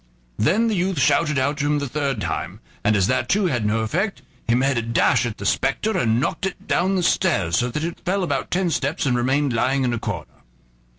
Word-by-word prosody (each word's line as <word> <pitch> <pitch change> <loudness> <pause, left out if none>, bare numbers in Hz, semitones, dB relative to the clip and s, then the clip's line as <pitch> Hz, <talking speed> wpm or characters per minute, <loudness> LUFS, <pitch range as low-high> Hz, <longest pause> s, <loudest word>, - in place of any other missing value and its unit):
Then 210 - +3
the 225 - 0
youth 185 -1 0
shouted 150 +3 +2
out 140 +3 0
to 145 0 -1
him 150 0 +2
the 145 -1 -2
third 140 -3 -2
time, - - -4 0.2
and 105 +1 +3
as 100 -3 +3
that 130 +5 0
too 200 0 +2
had 120 -10 0
no 110 +2 +1
effect, 180 - -2 0.2
he 115 - +3
made 135 +2 +2
a 120 - +1
dash 115 +1 +2
at 110 - -6
the 100 - -7
spectre 135 - 0
and 115 -10 +2
knocked 165 +7 -1
it 190 - -8
down 190 +2 +1
the 180 - 0
stairs, 95 - +2
so 125 - 0
that 150 +6 -3
it 170 0 -4
fell 185 +1 0
about 140 -6 -2
ten 180 -1 0
steps 145 +1 -1
and 125 -2 +2
remained 130 +2 +1
lying 130 +4 +1
in 125 -1 0
a 120 - -2
corner. 90 - -6
135 Hz, 235 wpm, -22 LUFS, 120-175 Hz, 0.2 s, Then